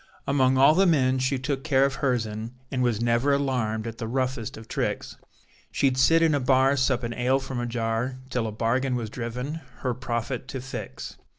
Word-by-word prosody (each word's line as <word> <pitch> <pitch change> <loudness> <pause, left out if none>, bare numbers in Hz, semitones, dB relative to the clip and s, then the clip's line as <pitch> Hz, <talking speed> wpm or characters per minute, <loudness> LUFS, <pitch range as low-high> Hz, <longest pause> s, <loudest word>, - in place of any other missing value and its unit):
Among 130 -2 +3
all 140 +3 +7
the 190 +3 +4
men 130 -5 +3
she 130 +1 +1
took 135 +1 -3
care 135 -3 +3
of 140 - 0
her 130 -3 +2
sen 110 +1 -5 0.2
and 130 - -1
was 120 -4 +1
never 120 +4 +2
alarmed 125 -6 0
at 115 -1 -6
the 115 - -3
roughest 130 -1 -2
of 110 0 -11
tricks, - - -3 0.6
She'd 135 -2 +2
sit 165 +6 +4
in 160 -2 +4
a 145 - +2
bar 130 +1 +3
suppin' 130 -3 0
ale 125 +2 +2
from 135 -2 -4
a 120 - -2
jar, 115 +2 -2
till 125 -3 0
a - - -4
bargain 125 +4 0
was 115 -3 -4
driven, 125 +7 -4 0.2
her 125 - +1
profit 120 0 -3
to 135 - -5
fix. 125 -5 -7
130 Hz, 200 wpm, -26 LUFS, 115-135 Hz, 0.6 s, all